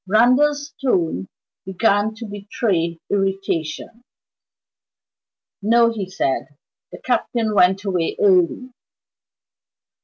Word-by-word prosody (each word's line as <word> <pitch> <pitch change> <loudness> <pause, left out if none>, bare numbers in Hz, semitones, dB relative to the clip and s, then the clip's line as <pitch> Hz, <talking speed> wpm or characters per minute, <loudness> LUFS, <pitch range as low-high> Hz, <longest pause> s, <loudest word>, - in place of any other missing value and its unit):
Randal's 285 +8 +3
tones 165 - 0 0.4
began 205 +2 +1
to 230 +1 -8
betray 200 -5 -2
irritation. 195 +1 -2 1.6
"No," 230 +3 +4
he 200 -5 -5
said 140 -8 -1 0.4
"the - - -10
Captain 235 -3 -1
went 190 0 +3
away 180 -4 -1
early." 195 +6 +2
205 Hz, 85 wpm, -20 LUFS, 185-230 Hz, 1.6 s, No